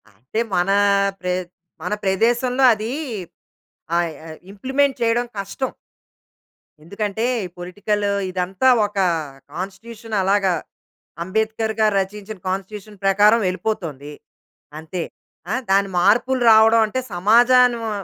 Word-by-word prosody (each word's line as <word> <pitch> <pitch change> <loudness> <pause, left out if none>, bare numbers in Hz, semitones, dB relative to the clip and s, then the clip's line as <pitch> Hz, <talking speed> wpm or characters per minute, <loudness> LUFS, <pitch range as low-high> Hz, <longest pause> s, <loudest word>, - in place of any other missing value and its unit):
అంటే, 130 - -5 0.2
మన 180 +2 +1 0.5
ప్రె 180 0 -2 0.5
మన - - -3
ప్రదేశంలో, 240 +7 +1
అది 215 +1 -4 1.1
ఆహ్, 170 -2 -1 0.2
ఆహ్, 155 - -10
ఇంప్లిమెంట్ 265 +6 0
చేయడం 235 +1 +1
కష్టం. 200 +7 -3 1.1
ఎందుకంటే, 205 +5 -3 0.2
ఈ - - -8
పొలిటికలూ 205 +3 -2 0.2
ఇదంతా 185 +6 0 0.2
ఒక 205 0 -8 0.5
కాన్స్టిట్యూషన్. 220 +6 -7
అలాగా 195 0 +2 0.7
'అంబేద్కర్ 220 +4 -1
గారు' 215 -2 +3
రచించిన 205 +2 -7
కాన్స్టిట్యూషన్ 200 +2 -5
ప్రకారం 205 +4 +5
వెళిపోతోంది. 170 -7 -4 0.7
అంతే. 165 +2 -5 0.5
ఆ! - - +1 0.2
దాని 195 0 +3
మార్పులు 240 +7 +2
రావడం 220 +1 +6
అంటే, 215 +5 -3
సమాజానివో 235 +4 +4
205 Hz, 105 wpm, -21 LUFS, 185-225 Hz, 1.1 s, రావడం